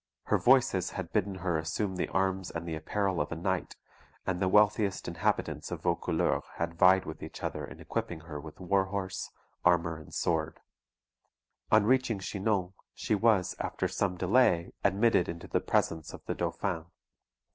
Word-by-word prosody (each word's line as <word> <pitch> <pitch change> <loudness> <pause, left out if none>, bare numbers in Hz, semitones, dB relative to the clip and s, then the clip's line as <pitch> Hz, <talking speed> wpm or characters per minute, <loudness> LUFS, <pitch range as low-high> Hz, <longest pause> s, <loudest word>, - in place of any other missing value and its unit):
Her - - +1
Voices 120 -8 +4
had 90 -4 -5
bidden 100 -2 +1
her 90 -3 -1
assume 95 +5 -2
the 90 - -1
arms 95 -1 0
and 85 0 -5
the 85 - -3
apparel 95 +3 -1
of 75 - -3
a - - -2
knight; 90 +2 -2 0.5
and 95 -2 -1
the 95 - +3
wealthiest 105 -1 +3
inhabitants 85 -1 -1
of - - -6
Vaucouleurs - - +1
had 85 0 -2
vied 90 +2 +5
with 80 - -7
each 80 - -8
other - - -3
in - - -9
equipping 80 -2 -4
her 75 -3 -7
with 75 0 -11
warhorse, 95 +1 -1 0.3
armour, 85 -2 +3
and 80 - -13
sword. 80 -2 -1 1.1
On 110 -1 +6
reaching 130 -2 +2
Chinon, 95 -1 -1 0.2
she - - -1
was, 105 -3 +3
after - - -1
some 95 -3 -1
delay, 90 -3 +3
admitted 100 0 +3
into 85 0 -6
the - - 0
presence 80 -1 0
of - - -11
the - - -1
Dauphin. 85 -5 -2
95 Hz, 165 wpm, -30 LUFS, 85-100 Hz, 1.1 s, On